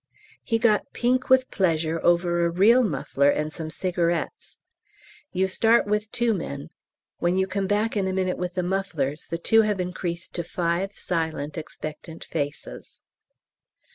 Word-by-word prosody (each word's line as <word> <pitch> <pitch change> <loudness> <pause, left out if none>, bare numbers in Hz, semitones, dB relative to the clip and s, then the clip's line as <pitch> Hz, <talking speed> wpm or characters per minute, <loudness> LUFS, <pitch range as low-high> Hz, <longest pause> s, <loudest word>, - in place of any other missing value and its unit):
He 225 - +1
got 225 -2 +2
pink 255 +2 +1
with 260 0 +4
pleasure 165 -3 0
over 175 0 +3
a 170 - +2
real 205 +9 +5
muffler 140 - +1
and 150 +1 -1
some 160 0 -5
cigarettes. 175 - -2 0.7
You 190 0 +1
start 225 +5 +3
with 210 +1 -1
two 235 -1 +2
men; 150 -5 -5 0.5
when 175 +2 +1
you 190 - +3
come 195 0 -2
back 210 +3 +1
in 195 -2 +1
a - - 0
minute 185 -1 -1
with 180 0 -3
the 180 - 0
mufflers 175 -6 -2
the 170 - -2
two 225 +6 +4
have 210 -3 0
increased 180 -1 -4
to 170 - -3
five 175 +3 -1
silent 160 -6 -3
expectant 155 0 -7
faces. 145 - -5
180 Hz, 155 wpm, -25 LUFS, 165-205 Hz, 0.7 s, real